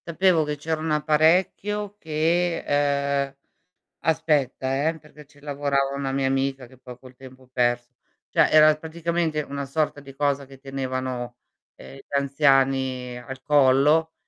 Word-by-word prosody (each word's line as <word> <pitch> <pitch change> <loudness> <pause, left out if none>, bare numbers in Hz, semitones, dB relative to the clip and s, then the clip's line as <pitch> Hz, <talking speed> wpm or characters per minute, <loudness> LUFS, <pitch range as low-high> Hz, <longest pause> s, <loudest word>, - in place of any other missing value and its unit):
Sapevo 170 -1 +3
che 150 0 -4
c'era 155 +2 -3
un 160 - -3
apparecchio 180 +7 +1
che 165 +2 0
ehm 140 -1 0 0.7
aspetta 140 -2 +1
eh, 165 0 -3
perché 150 -1 -16
ci 145 0 -23
lavorava 140 -1 -1
una 140 -1 -3
mia 135 0 0
amica 135 -1 -1
che 130 +2 -18
poi 125 -1 -11
col 130 0 -15
tempo 130 0 -15
perso. 120 0 0 0.4
Cioè - - +4
era 155 0 +7
praticamente 160 0 -2
una 140 -1 -5
sorta 145 +1 -2
di 140 -1 -12
cosa 140 -1 0
che 135 0 -15
tenevano, 130 -2 -4 0.4
uhm, - - -13
gli - - -15
anziani 135 -3 +1
al 130 +2 -9
collo, 150 +3 +3
140 Hz, 145 wpm, -24 LUFS, 135-155 Hz, 0.7 s, era